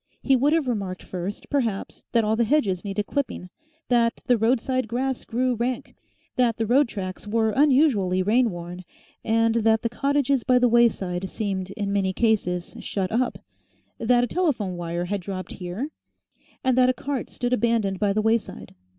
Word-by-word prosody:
He 270 - +4
would 275 +4 +3
have 325 -5 +1
remarked 195 -6 -3
first, 185 +2 -6
perhaps, 235 -9 -2
that 230 -1 +3
all 215 +1 +1
the 235 - +2
hedges 215 -8 +1
needed 205 0 -2
clipping, 255 -10 -3 0.4
that 235 -2 +2
the 250 - +4
roadside 245 +2 +1
grass 255 +3 -2
grew 250 +2 0
rank, 240 +1 -3 0.4
that 240 -3 +2
the 225 - 0
road 260 +5 +4
tracks 190 -2 -6
were 220 +1 +1
unusually 255 -10 +3
rainworn, 185 -5 0 0.4
and 225 0 +2
that 225 0 +2
the 230 - 0
cottages 275 0 +1
by 250 - +4
the 250 0 +4
wayside 195 -6 +2
seemed 195 -3 -3
in 200 -1 -2
many 190 -2 +1
cases 185 -6 0
shut 190 -2 -3
up, 240 +2 0 0.6
that 240 +1 +3
a - - +1
telephone 240 - 0
wire 175 0 -3
had 200 +1 -2
dropped 185 0 -6
here, 185 +10 -5 0.7
and 260 -2 +2
that 255 0 +5
a - - +3
cart 275 -1 -4
stood 245 0 -2
abandoned 220 -5 +1
by 205 -2 +2
the 215 +2 0
wayside. 220 - -1
225 Hz, 170 wpm, -24 LUFS, 195-250 Hz, 0.7 s, that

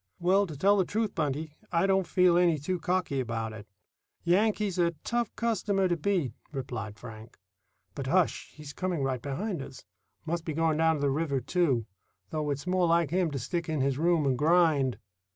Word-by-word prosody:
"Well, 195 +3 +3
to 155 -4 -8
tell 200 +7 +4
the 190 - +4
truth, 215 +3 -2
Buntie, 150 0 -2 0.2
I 170 +1 +2
don't 190 -2 +2
feel 180 -2 +4
any 175 -2 +4
too 175 +6 -2
cocky 175 -4 -1
about 115 -3 -3
it. 110 -1 -10 0.6
Yankee's 200 +1 +1
a 170 -1 +2
tough 235 -2 0
customer 205 -4 +1
to 175 - +1
beat," 170 - 0 0.2
replied 120 -7 -5
Frank. 110 -2 -11 0.6
"But, - - -5
hush! - - +1
he's 150 -1 -9
coming 180 -6 -2
right 130 -2 -1
behind 170 - -3
us. 135 -4 -10 0.4
Must 165 +1 -2
be 160 - -3
going 160 -1 +1
down 160 0 +3
to 145 - -4
the 140 -1 +2
river 140 -1 0
too, 135 - +1 0.5
though 155 -1 -2
it's 140 +1 -3
more 180 -1 +2
like 165 -3 +2
him 180 -1 +2
to 145 - -4
stick 165 +6 -3
in 155 -3 0
his 135 0 0
room 165 -2 +2
and 135 -2 +2
grind." 155 -5 +3
160 Hz, 190 wpm, -29 LUFS, 140-180 Hz, 0.6 s, tell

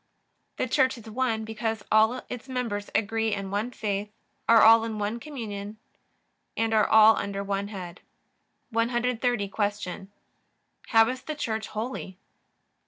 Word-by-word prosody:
A. - - 0
The - - -1
Church 260 +1 +2
is 230 -1 -12
One 225 -1 -1
because 220 -1 -3
all 220 +4 +4
its 250 +2 -8
members 230 -6 -3
agree 225 0 +1
in 195 -1 -5
one 210 +4 -1
faith, 210 -3 -3 0.4
are 230 -1 +7
all 225 +1 +8
in 225 -1 -4
one 210 +3 -2
communion, 220 -7 -7 0.8
and 225 0 +1
are 215 -1 +4
all 220 0 +7
under 200 0 -3
one 200 0 -2
Head. 180 -4 -8 0.7
130. 240 -1 0
Q. 205 -2 -3 0.8
How 225 -1 +5
is 255 +1 -3
the 310 - -5
Church 220 -7 -3
Holy? 215 -4 -5
220 Hz, 145 wpm, -27 LUFS, 205-235 Hz, 0.8 s, all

